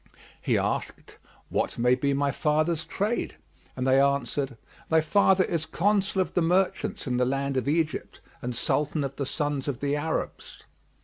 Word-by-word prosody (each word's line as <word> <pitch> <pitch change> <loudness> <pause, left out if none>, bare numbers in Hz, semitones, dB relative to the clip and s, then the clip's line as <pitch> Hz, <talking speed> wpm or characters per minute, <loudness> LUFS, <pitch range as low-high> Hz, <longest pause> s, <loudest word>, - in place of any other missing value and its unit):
He - - +1
asked, - - -3 0.3
"What - - -1
may 125 +1 +4
be 140 +2 +1
my 140 0 +1
father's 155 +3 +1
trade?"; 205 - -2 0.4
and 125 - -2
they 135 +1 +5
answered, 140 -1 0 0.3
"Thy 160 - +5
father 190 +4 +4
is 160 -3 -2
Consul 200 0 +1
of - - -12
the 175 - +2
merchants 180 +3 +1
in 125 -2 -1
the 125 - +3
land 135 +1 -1
of 130 +1 -1
Egypt 155 -1 -1 0.2
and 125 0 -3
Sultan 150 +4 0
of 140 0 -5
the 140 - -2
Sons 145 -2 -2
of 140 -4 -2
the 145 0 0
Arabs." 160 +2 -4
145 Hz, 170 wpm, -27 LUFS, 135-165 Hz, 0.4 s, they